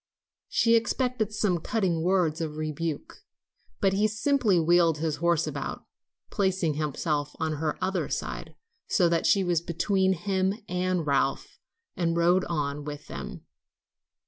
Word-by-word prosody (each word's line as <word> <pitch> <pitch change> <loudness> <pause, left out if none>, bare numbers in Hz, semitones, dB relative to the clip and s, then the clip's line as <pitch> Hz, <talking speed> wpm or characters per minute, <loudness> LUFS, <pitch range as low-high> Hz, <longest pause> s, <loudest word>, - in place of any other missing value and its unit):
She 230 -1 +3
expected 230 -1 0
some 210 -4 0
cutting 180 -3 0
word 175 -2 +1
of 155 -2 -4
rebuke, 155 0 -4 0.6
but 195 -1 +2
he 205 +2 +3
simply 220 -3 +2
wheeled 170 -1 +4
his 155 -1 -1
horse 170 -1 +2
about, - - -5 0.5
placing 190 -5 +1
himself 150 0 -2
on 155 -1 -1
her 155 0 -2
other 190 0 -1
side, - - -4 0.3
so 180 -5 +3
that 165 -1 +1
she 195 - +4
was 175 -3 +1
between 190 +3 +1
him 190 +2 0
and 180 -1 -1
Ralph, 140 -1 0 0.4
and 170 -1 0
rode 175 +2 +3
on 150 -3 -2
with 145 0 -8
them. - - -7
175 Hz, 140 wpm, -27 LUFS, 155-190 Hz, 0.6 s, wheeled